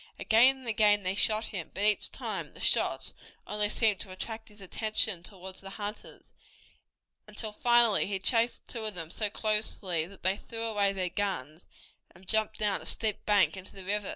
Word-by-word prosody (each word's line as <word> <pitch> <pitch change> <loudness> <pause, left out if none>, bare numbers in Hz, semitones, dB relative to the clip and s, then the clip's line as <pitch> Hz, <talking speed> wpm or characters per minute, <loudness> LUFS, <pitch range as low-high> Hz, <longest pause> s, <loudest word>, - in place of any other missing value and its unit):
Again 250 +5 +5
and 260 -2 -12
again 210 -2 +3
they 185 +1 0
shot 215 +2 +2
him, 185 -7 -5
but 200 - -1
each 210 0 +3
time - - -5
the - - -14
shots - - +1 0.3
only 210 0 0
seemed 215 -3 +1
to 195 - -5
attract 220 +5 -7
his 210 0 -17
attention 215 -1 0
toward 190 0 -9
the 195 - -10
hunters, 205 +1 -6 0.9
until 210 +1 -3
finally 235 -2 +3
he 200 -1 -2
chased 230 +4 +2
two 230 -3 -5
of 215 -3 -3
them 165 -2 -6
so 210 +1 0
closely 205 -6 0
that 200 +1 -16
they 190 +2 +1
threw 225 +1 -7
away 205 -3 +1
their 185 -2 -2
guns, 170 -5 -3 0.5
and 185 +1 -18
jumped 220 0 +1
down 205 -2 0
a - - -12
steep 215 -2 0
bank 205 -2 +4
into 190 0 -9
the 190 -1 -8
river. 205 0 -1
205 Hz, 185 wpm, -29 LUFS, 190-220 Hz, 0.9 s, Again